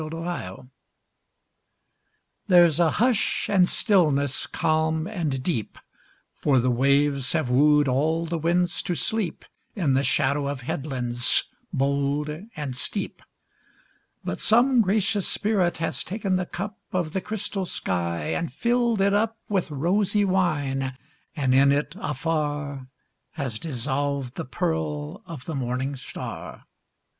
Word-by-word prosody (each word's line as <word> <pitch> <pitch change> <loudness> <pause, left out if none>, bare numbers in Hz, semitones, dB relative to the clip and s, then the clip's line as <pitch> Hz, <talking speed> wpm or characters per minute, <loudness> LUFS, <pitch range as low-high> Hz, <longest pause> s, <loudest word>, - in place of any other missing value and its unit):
8 - - -3
Autoplay 160 - -5 1.8
There's 175 -4 +6
a 170 -2 +5
hush 230 +3 +1
and 185 -3 +4
stillness 150 - +2
calm 160 0 0
and 160 -10 -2
deep, 125 - -2 0.6
For 140 -3 +2
the 125 +1 +2
waves 140 +2 +2
have 155 -7 0
wooed 150 +2 +5
all 155 +6 +1
the 165 0 -2
winds 175 +2 +1
to 175 - -2
sleep 215 -1 -2 0.3
In 165 -10 +1
the 135 +1 +2
shadow 140 0 +1
of 140 -2 -3
headlands 125 -2 0 0.3
bold 140 +2 0 0.2
and 145 -4 -4
steep; - - -3 1.0
But 90 - -3
some 240 +3 +4
gracious 205 0 +1
spirit 200 -5 +1
has 165 0 -2
taken 195 -1 -1
the 185 -1 -1
cup 205 +4 -5
Of 175 -4 -1
the 190 - -1
crystal 200 -2 -3
sky 85 - -2
and 165 -5 -2
filled 235 - +1
it 200 0 +3
up 225 +2 +1
With 195 -5 0
rosy 195 +8 +1
wine, 145 -8 0 0.4
and 135 -4 +1
in 140 +1 +6
it 145 +2 0
afar 145 - -2 0.5
Has 130 -8 -3
dissolved 140 -2 -2
the - - -5
pearl 160 - -2
of 155 -6 -8
the 165 - -4
morning 130 +1 -2
star. 130 - -7
155 Hz, 130 wpm, -25 LUFS, 135-185 Hz, 1.8 s, There's